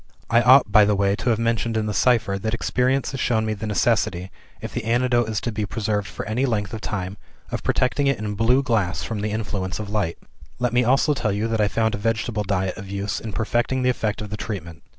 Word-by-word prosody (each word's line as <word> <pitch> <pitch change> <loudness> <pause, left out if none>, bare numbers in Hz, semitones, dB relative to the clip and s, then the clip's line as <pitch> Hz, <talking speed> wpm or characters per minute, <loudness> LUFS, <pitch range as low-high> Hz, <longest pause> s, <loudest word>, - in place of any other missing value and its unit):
"I 115 +1 +5
ought, 125 -3 +6
by 105 +1 +7
the 105 0 +3
way, 100 0 +2
to 125 - -1
have 115 - +3
mentioned 115 0 0
in 110 - 0
the 105 - -2
cipher 110 -2 +2
that 110 +3 -1
experience 125 +3 0
has 135 - -5
shown 110 -3 +1
me 110 - -1
the 110 +1 -5
necessity, 95 -2 0 0.3
if - - -7
the 120 - -3
antidote 120 0 +2
is 110 -2 -1
to 120 - -2
be 105 0 -3
preserved 105 -1 -2
for - - -6
any 120 +6 0
length 105 -4 -1
of 110 - -5
time, 95 -2 -4 0.3
of - - -3
protecting 140 +2 +1
it 140 - +2
in 105 -1 -3
blue 120 +6 +3
glass 95 - 0
from 110 -3 -4
the 105 - -1
influence 105 -4 -3
of 105 -2 -6
light. 100 -6 -1 0.4
"Let 125 -1 -1
me 125 0 +4
also 135 +5 +3
tell 110 -6 -1
you 105 +3 -1
that 115 -1 0
I 105 - +3
found 110 +1 0
a 105 - -3
vegetable 115 0 -1
diet 95 -2 -1
of 95 0 -8
use 100 +1 -3
in 110 - -6
perfecting 120 +5 0
the 125 - +4
effect 105 -3 -2
of 105 - -8
the 105 - -3
treatment. 85 -8 -6
110 Hz, 245 wpm, -23 LUFS, 100-120 Hz, 0.4 s, by